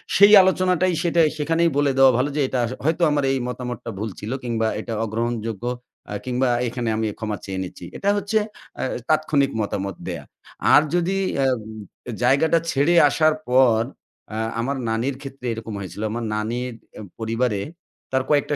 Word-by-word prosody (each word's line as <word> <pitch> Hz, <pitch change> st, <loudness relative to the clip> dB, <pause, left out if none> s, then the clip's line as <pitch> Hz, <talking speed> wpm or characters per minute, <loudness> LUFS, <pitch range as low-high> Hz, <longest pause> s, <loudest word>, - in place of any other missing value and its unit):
সেই 200 Hz, +2 st, +8 dB
আলোচনাটাই, 185 Hz, -1 st, +2 dB
সেটাই 170 Hz, -2 st, +4 dB
সেখানেই 165 Hz, +3 st, +2 dB
বলে 145 Hz, -1 st, +3 dB
দেয়া 135 Hz, -1 st, +7 dB
ভালো 135 Hz, +3 st, +1 dB
যে, 150 Hz, -, +1 dB
"এটার 125 Hz, -2 st, 0 dB, 0.2 s
হয় 160 Hz, +3 st, +2 dB
তো 175 Hz, -, +2 dB
আমার 145 Hz, -1 st, +1 dB
এই 135 Hz, -, 0 dB
মতামতটা 125 Hz, -2 st, -5 dB
ভুল 110 Hz, +2 st, -3 dB
ছিল"। 105 Hz, -, -5 dB
কিংবা 115 Hz, -2 st, 0 dB
"এটা 115 Hz, -, -5 dB
অগ্রহণযোগ্য," 115 Hz, 0 st, -3 dB, 0.5 s
আ -, -, -3 dB
কিংবা 130 Hz, +1 st, 0 dB, 0.2 s
"এখানে 120 Hz, -1 st, -2 dB
আমি 110 Hz, -, 0 dB
ক্ষমা 110 Hz, -2 st, -3 dB
চেয়ে 95 Hz, -1 st, -4 dB
নিচ্ছি।" 90 Hz, -, -9 dB
এটা 200 Hz, -, 0 dB
হচ্ছে 205 Hz, +2 st, 0 dB, 0.4 s
এ -, -, 0 dB, 0.2 s
তাৎক্ষণিক 150 Hz, -3 st, +2 dB
মতামত 100 Hz, -2 st, -3 dB
দেয়া। -, -, -4 dB, 0.5 s
আর -, -, +8 dB
যদি 175 Hz, +2 st, +1 dB, 0.3 s
এ -, -, +3 dB, 0.8 s
জায়গাটা 150 Hz, +6 st, +4 dB
ছেড়ে 145 Hz, +5 st, +2 dB, 0.2 s
আসার 155 Hz, +2 st, +3 dB, 0.2 s
পর, 125 Hz, -3 st, +5 dB, 0.5 s
আ 110 Hz, -, -3 dB, 0.2 s
আমার 135 Hz, +4 st, -1 dB
নানির 120 Hz, +5 st, -1 dB
ক্ষেত্রে 135 Hz, -2 st, -9 dB
এরকম 115 Hz, -1 st, -7 dB
হয়েছিল। 100 Hz, +1 st, -7 dB
আমার 120 Hz, +1 st, -3 dB
নানির 120 Hz, +3 st, -2 dB, 0.5 s
পরিবারে, 115 Hz, -2 st, 0 dB, 0.5 s
তার 130 Hz, 0 st, +1 dB
কয়েকটা 145 Hz, 0 st, +2 dB
130 Hz, 160 wpm, -22 LUFS, 115-155 Hz, 0.8 s, সেই